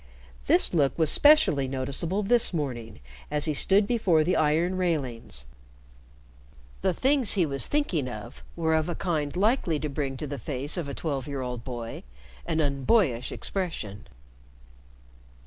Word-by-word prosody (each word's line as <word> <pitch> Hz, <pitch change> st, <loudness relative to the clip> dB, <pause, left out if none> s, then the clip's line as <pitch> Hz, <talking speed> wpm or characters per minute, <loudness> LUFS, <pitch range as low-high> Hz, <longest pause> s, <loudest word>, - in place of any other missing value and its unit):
This -, -, +3 dB
look 145 Hz, -5 st, +2 dB
was 160 Hz, -2 st, +2 dB
specially 290 Hz, -, +5 dB
noticeable 140 Hz, +9 st, -2 dB
this 225 Hz, -3 st, +2 dB
morning 120 Hz, -, -4 dB, 0.3 s
as 150 Hz, 0 st, +1 dB
he 155 Hz, -, 0 dB
stood 195 Hz, +8 st, +3 dB
before 195 Hz, -9 st, +2 dB
the 180 Hz, +4 st, +1 dB
iron 160 Hz, +4 st, +2 dB
railings. 135 Hz, -, -2 dB, 1.4 s
The 190 Hz, -, +2 dB
things 265 Hz, +4 st, +3 dB
he 185 Hz, -4 st, +3 dB
was 140 Hz, -2 st, -1 dB
thinking 190 Hz, -, 0 dB
of 120 Hz, +2 st, -8 dB
were 160 Hz, -1 st, 0 dB
of 160 Hz, +1 st, +1 dB
a 175 Hz, -, -2 dB
kind 155 Hz, -4 st, -2 dB
likely 200 Hz, -, +1 dB
to 150 Hz, -, -3 dB
bring 135 Hz, -2 st, -3 dB
to 150 Hz, -, -5 dB
the 140 Hz, -1 st, -5 dB
face 135 Hz, +4 st, -3 dB
of 170 Hz, -6 st, -3 dB
a 140 Hz, -, -5 dB
twelve 140 Hz, -5 st, -3 dB
year 140 Hz, -2 st, -4 dB
old 125 Hz, -2 st, -5 dB
boy 120 Hz, -2 st, -6 dB, 0.5 s
an 160 Hz, -, 0 dB
unboyish 140 Hz, -, +1 dB
expression. 115 Hz, -, -4 dB
150 Hz, 150 wpm, -27 LUFS, 135-180 Hz, 1.4 s, specially